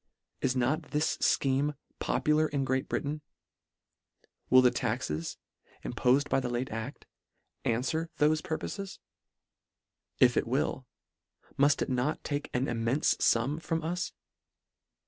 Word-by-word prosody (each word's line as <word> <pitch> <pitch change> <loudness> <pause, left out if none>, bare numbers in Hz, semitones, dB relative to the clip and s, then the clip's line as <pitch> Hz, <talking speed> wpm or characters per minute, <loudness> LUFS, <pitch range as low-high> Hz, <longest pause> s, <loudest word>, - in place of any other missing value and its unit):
Is 125 - +1
not 140 +6 0
this 150 +1 +1
fcheme 140 +2 +2 0.2
popu 150 - +1
lar 155 0 +3
in 140 -3 -1
Great 130 0 -1
Britain? 150 +2 -2 1.3
Will 130 0 +7
the 125 - +6
taxes, 105 - -2 0.5
impof 125 +3 +3
ed 145 - -6
by - - +3
the 125 -2 -3
late 120 +2 -2
act, 115 +5 -6 0.6
anfwer 150 +8 0
thofe 155 +1 +3
purpofes? 195 +4 -4 1.2
If - - +5
it - - +1
will, - - -1 0.7
mult 140 +1 +3
it - - -5
not 125 +4 0
take 145 0 -3
an 125 +1 0
immenfe 120 +4 +1
fum 135 +7 +2
from 165 -1 -2
us 175 +3 -2
140 Hz, 130 wpm, -30 LUFS, 125-155 Hz, 1.3 s, Will